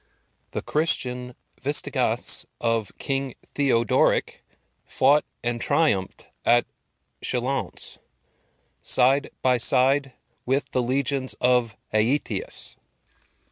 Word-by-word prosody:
The -, -, -7 dB
Christian 125 Hz, -5 st, +1 dB, 0.3 s
Vistigoths -, -, +4 dB
of 115 Hz, -3 st, -3 dB
King 135 Hz, -2 st, -4 dB
Theodoric 125 Hz, -5 st, -1 dB, 0.4 s
fought 145 Hz, +3 st, 0 dB, 0.2 s
and 120 Hz, -1 st, -4 dB
triumphed 100 Hz, -, -2 dB, 0.2 s
at 120 Hz, 0 st, +1 dB, 0.6 s
Chalons, 130 Hz, +2 st, 0 dB, 0.8 s
side 135 Hz, +3 st, +3 dB
by 125 Hz, -1 st, +1 dB
side 130 Hz, +3 st, +4 dB, 0.3 s
with 135 Hz, +3 st, -3 dB
the 125 Hz, -, -1 dB
legions 130 Hz, +1 st, 0 dB
of 125 Hz, -2 st, -1 dB, 0.2 s
Aetius. 140 Hz, -, 0 dB
130 Hz, 85 wpm, -22 LUFS, 120-140 Hz, 0.8 s, Vistigoths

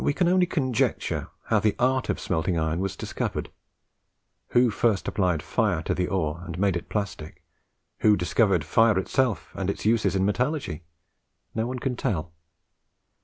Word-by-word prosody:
We 145 Hz, -, +2 dB
can 180 Hz, -, +2 dB
only 180 Hz, 0 st, +4 dB
conjecture 130 Hz, -9 st, 0 dB, 0.2 s
how -, -, +2 dB
the 105 Hz, -2 st, +1 dB
art 130 Hz, +1 st, +1 dB
of -, -, 0 dB
smelting 85 Hz, 0 st, -1 dB
iron 80 Hz, +1 st, 0 dB
was 95 Hz, 0 st, -2 dB
discovered. -, -, -4 dB, 1.0 s
Who 120 Hz, -1 st, +3 dB
first 105 Hz, -3 st, +1 dB
applied 90 Hz, -6 st, 0 dB
fire 95 Hz, -1 st, 0 dB
to -, -, 0 dB
the 90 Hz, -1 st, -1 dB
ore, 85 Hz, -4 st, -1 dB
and 85 Hz, -1 st, -6 dB
made 95 Hz, -1 st, +2 dB
it 85 Hz, -, -5 dB
plastic; 100 Hz, -7 st, -4 dB, 0.6 s
who 105 Hz, -1 st, +5 dB
discovered 90 Hz, 0 st, +2 dB
fire 115 Hz, -3 st, +4 dB
itself, 120 Hz, +4 st, 0 dB
and 95 Hz, -1 st, -2 dB
its 100 Hz, -, -4 dB
uses 110 Hz, -2 st, +2 dB
in 95 Hz, 0 st, +2 dB
metallurgy? 125 Hz, -, -1 dB, 0.7 s
No 110 Hz, +1 st, -1 dB
one 130 Hz, +1 st, -3 dB
can 125 Hz, 0 st, -2 dB
tell. 85 Hz, -8 st, -2 dB
100 Hz, 165 wpm, -26 LUFS, 90-120 Hz, 1.0 s, who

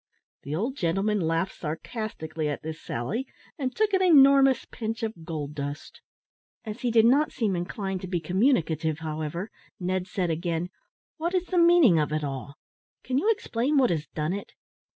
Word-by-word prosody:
'" -, -, -75 dB
The 145 Hz, +2 st, -3 dB
old 240 Hz, -, -2 dB
gentleman 195 Hz, +5 st, +1 dB
laughed 165 Hz, +2 st, 0 dB
sarcastically 160 Hz, -2 st, -4 dB
at 145 Hz, -, -4 dB
this 160 Hz, 0 st, -6 dB
sally, 210 Hz, -, -3 dB, 0.3 s
and 260 Hz, -2 st, -2 dB
took 430 Hz, -1 st, +1 dB
an 380 Hz, -, +3 dB
enormous 275 Hz, -6 st, +6 dB
pinch 225 Hz, 0 st, -5 dB
of 220 Hz, -7 st, -4 dB
gold 150 Hz, -3 st, -4 dB
dust. 145 Hz, 0 st, -6 dB, 0.6 s
As 215 Hz, +1 st, -6 dB
he 245 Hz, -, +1 dB
did 225 Hz, -1 st, +5 dB
not 280 Hz, +6 st, +4 dB
seem 210 Hz, -5 st, 0 dB
inclined 190 Hz, +2 st, -3 dB
to 185 Hz, -, -5 dB
be 180 Hz, -1 st, -1 dB
communicative, 165 Hz, -, +1 dB
however, 160 Hz, +5 st, -4 dB, 0.3 s
Ned 185 Hz, 0 st, -1 dB
said 180 Hz, -3 st, -1 dB
again, 170 Hz, +1 st, -2 dB, 0.5 s
"What 340 Hz, +3 st, -1 dB
is 365 Hz, -1 st, +1 dB
the 365 Hz, -1 st, +1 dB
meaning 335 Hz, -, +6 dB
of 150 Hz, 0 st, 0 dB
it 155 Hz, 0 st, -1 dB
all? 140 Hz, 0 st, -5 dB, 0.5 s
can 260 Hz, +1 st, 0 dB
you 415 Hz, -, +1 dB
explain 285 Hz, -, 0 dB
what 255 Hz, -6 st, +4 dB
has 160 Hz, -2 st, -2 dB
done 155 Hz, +3 st, -2 dB
it?" 200 Hz, -, -6 dB
190 Hz, 175 wpm, -27 LUFS, 160-255 Hz, 0.6 s, enormous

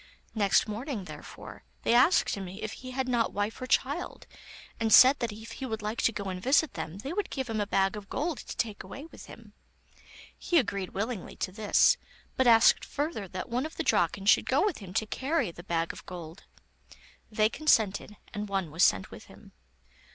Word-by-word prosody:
Next 205 Hz, -2 st, +3 dB
morning, 220 Hz, +1 st, -4 dB
therefore, -, -, -11 dB, 0.2 s
they -, -, +2 dB
asked 255 Hz, +10 st, +4 dB
him 195 Hz, -2 st, -5 dB
if 200 Hz, +3 st, -6 dB
he 255 Hz, -, -9 dB
had 260 Hz, 0 st, -2 dB
not 240 Hz, -3 st, +1 dB
wife 205 Hz, +4 st, -3 dB
or 255 Hz, -, -4 dB
child, 270 Hz, -, -1 dB, 0.5 s
and 225 Hz, -1 st, 0 dB
said 260 Hz, +5 st, +8 dB
that 235 Hz, -3 st, -2 dB
if 220 Hz, +2 st, -10 dB
he 265 Hz, -, -6 dB
would 220 Hz, -2 st, -4 dB
like 215 Hz, +2 st, -2 dB
to -, -, +3 dB
go 205 Hz, -, -5 dB
and 180 Hz, -1 st, -5 dB
visit 285 Hz, -, +3 dB
them 165 Hz, +4 st, -6 dB
they 270 Hz, +10 st, -5 dB
would 410 Hz, 0 st, -2 dB
give 265 Hz, -2 st, -3 dB
him 220 Hz, -2 st, -2 dB
a 205 Hz, -, -2 dB
bag 195 Hz, 0 st, +1 dB
of 205 Hz, -2 st, -9 dB
gold 320 Hz, +2 st, -2 dB
to -, -, -8 dB
take 215 Hz, -3 st, -2 dB
away 280 Hz, -, -9 dB
with 330 Hz, -, -13 dB
him. -, -, -14 dB, 0.8 s
He 350 Hz, -, 0 dB
agreed 200 Hz, -, -1 dB
willingly 210 Hz, 0 st, -4 dB
to 185 Hz, -, -3 dB
this, 210 Hz, +1 st, +3 dB, 0.4 s
but 260 Hz, -, +2 dB
asked 230 Hz, -1 st, +6 dB
further 290 Hz, -, -3 dB
that 185 Hz, +1 st, -6 dB
one 250 Hz, +1 st, -1 dB
of 320 Hz, -, -15 dB
the 325 Hz, -, -1 dB
Draken 195 Hz, -, +1 dB
should 205 Hz, -, +4 dB
go 275 Hz, +9 st, +3 dB
with 405 Hz, -7 st, -1 dB
him 195 Hz, -4 st, -10 dB
to 220 Hz, -, +1 dB
carry 270 Hz, -, -1 dB
the 170 Hz, -, -11 dB
bag 165 Hz, -2 st, -2 dB
of -, -, -11 dB
gold. 175 Hz, 0 st, -9 dB, 0.8 s
They 215 Hz, 0 st, +3 dB
consented, 215 Hz, -7 st, +1 dB, 0.2 s
and 210 Hz, 0 st, -4 dB
one 190 Hz, -5 st, -2 dB
was 165 Hz, +3 st, +1 dB
sent 95 Hz, -2 st, +3 dB
with -, -, -11 dB
him. -, -, -16 dB
220 Hz, 205 wpm, -29 LUFS, 195-260 Hz, 0.8 s, said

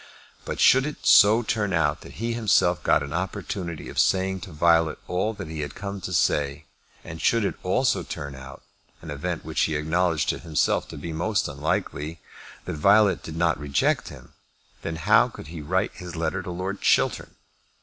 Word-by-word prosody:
But -, -, -5 dB
should 135 Hz, +2 st, +5 dB
it 150 Hz, -, -8 dB
so 110 Hz, +4 st, +7 dB
turn 105 Hz, -3 st, -1 dB
out 75 Hz, -1 st, +1 dB
that -, -, -12 dB
he 115 Hz, +2 st, -3 dB
himself 95 Hz, -7 st, +2 dB
got 70 Hz, -, +3 dB
an 70 Hz, 0 st, -6 dB
opportunity 95 Hz, -2 st, -4 dB
of -, -, -4 dB
saying 95 Hz, 0 st, +2 dB
to -, -, -9 dB
Violet 80 Hz, 0 st, +3 dB
all 95 Hz, +5 st, 0 dB
that -, -, -7 dB
he 80 Hz, 0 st, -6 dB
had 75 Hz, -1 st, -5 dB
come 100 Hz, -1 st, -6 dB
to 90 Hz, -, -5 dB
say, 75 Hz, -3 st, 0 dB, 0.4 s
and 80 Hz, -1 st, -8 dB
should 115 Hz, -3 st, +2 dB
it -, -, -1 dB
also 125 Hz, +7 st, +1 dB
turn 70 Hz, -1 st, -6 dB
out, 65 Hz, 0 st, -11 dB, 0.4 s
an 80 Hz, -, -7 dB
event 85 Hz, +4 st, -4 dB
which -, -, -1 dB
he 80 Hz, -, +1 dB
acknowledged 80 Hz, +1 st, 0 dB
to -, -, -1 dB
himself 80 Hz, -4 st, 0 dB
to -, -, -9 dB
be 80 Hz, +3 st, -6 dB
most 95 Hz, +6 st, 0 dB
unlikely, 75 Hz, +2 st, -3 dB, 0.5 s
that -, -, -4 dB
Violet 100 Hz, +5 st, +4 dB
did 80 Hz, -, -8 dB
not 85 Hz, 0 st, +1 dB
reject 70 Hz, -1 st, 0 dB
him, -, -, -13 dB, 0.5 s
then 80 Hz, -, -4 dB
how 80 Hz, -, +4 dB
could -, -, -11 dB
he 80 Hz, -2 st, -7 dB
write 90 Hz, +6 st, 0 dB
his 90 Hz, -3 st, -9 dB
letter 85 Hz, +3 st, -2 dB
to 90 Hz, -, -8 dB
Lord 95 Hz, +3 st, -4 dB
Chiltern? -, -, +1 dB
85 Hz, 190 wpm, -25 LUFS, 75-95 Hz, 0.5 s, so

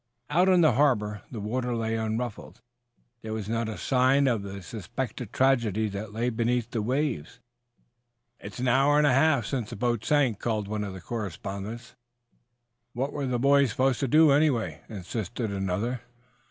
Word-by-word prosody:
Out 180 Hz, +5 st, +4 dB
on 180 Hz, -2 st, +5 dB
the 155 Hz, -, +6 dB
harbor 110 Hz, -6 st, +1 dB
the 115 Hz, -, -6 dB
water 120 Hz, +4 st, -2 dB
lay 115 Hz, -1 st, -1 dB
unruffled. 110 Hz, +2 st, -4 dB, 0.6 s
There 110 Hz, -1 st, -5 dB
was 110 Hz, -2 st, -4 dB
not 115 Hz, 0 st, -1 dB
a 110 Hz, -, -5 dB
sign 130 Hz, +2 st, +3 dB
of 120 Hz, -5 st, +1 dB
the 100 Hz, -1 st, -7 dB
suspected 115 Hz, +1 st, -5 dB
tragedy 115 Hz, -5 st, +2 dB
that 100 Hz, +1 st, -6 dB
lay 120 Hz, +3 st, -1 dB
beneath 120 Hz, +1 st, -1 dB
the 115 Hz, -, -1 dB
waves. 125 Hz, -, -2 dB, 1.0 s
"It's 100 Hz, -, -9 dB
an 125 Hz, +1 st, -1 dB
hour 135 Hz, +4 st, +4 dB
and 150 Hz, -, +4 dB
a 140 Hz, -, +4 dB
half 135 Hz, -3 st, +3 dB
since 125 Hz, -5 st, -3 dB
the -, -, -6 dB
boat 120 Hz, 0 st, -1 dB
sank," 135 Hz, -8 st, +2 dB
called 110 Hz, -3 st, -2 dB
one 105 Hz, 0 st, -2 dB
of 100 Hz, -2 st, -5 dB
the 95 Hz, -, -9 dB
correspondents. 105 Hz, +2 st, -6 dB, 1.0 s
"What 135 Hz, +4 st, -2 dB
were 140 Hz, -2 st, -2 dB
the 125 Hz, -1 st, 0 dB
boys 140 Hz, +1 st, +4 dB
supposed 130 Hz, +3 st, +1 dB
to 135 Hz, -, 0 dB
do, 155 Hz, +3 st, +6 dB
anyway?" 125 Hz, -, +1 dB
insisted 110 Hz, +2 st, -4 dB
another. 100 Hz, +6 st, -2 dB
120 Hz, 170 wpm, -27 LUFS, 105-135 Hz, 1.0 s, the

